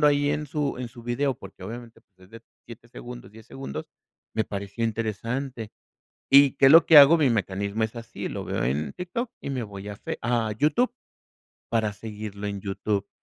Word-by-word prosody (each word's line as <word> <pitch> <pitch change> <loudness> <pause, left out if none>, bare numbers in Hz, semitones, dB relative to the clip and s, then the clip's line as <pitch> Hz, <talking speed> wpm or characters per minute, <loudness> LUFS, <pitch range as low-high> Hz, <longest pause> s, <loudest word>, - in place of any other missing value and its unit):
presentando 150 - +5
ahí 145 0 +3
en 150 0 -2
su 145 -2 -2
en 125 -1 -4
su 120 0 -13
video, 130 +3 0
porque 95 -4 -13
obviamente, 115 +3 -8
pues, 95 -2 -47
es 95 - -27
de 115 0 -12 0.2
7 115 0 -12
segundos, 120 -1 -10
10 110 0 -15
segundos, 135 - -7 0.5
me 110 - +1
pareció 100 +3 -4
interesante. 115 +2 -3 0.6
¿Y 140 0 +8
qué - - +5
es - - +7
lo 165 +1 +9
que 160 - +8
hago? 145 +4 +9
Mi 145 -5 +3
mecanismo 100 0 -1
es 110 +2 -3
así, 115 -1 -6
lo - - -5
veo - - -2
en 70 +5 -1
TikTok 205 +7 -4
y - - -5
me 130 -3 -2
voy 100 -1 -8
a 105 - -6
fe - - -6
a 120 -2 0
YouTube 155 - +2 0.8
para 110 -3 0
seguirlo 105 -1 -7
en 100 -1 -4
YouTube, 100 0 -2
115 Hz, 200 wpm, -26 LUFS, 105-135 Hz, 0.8 s, lo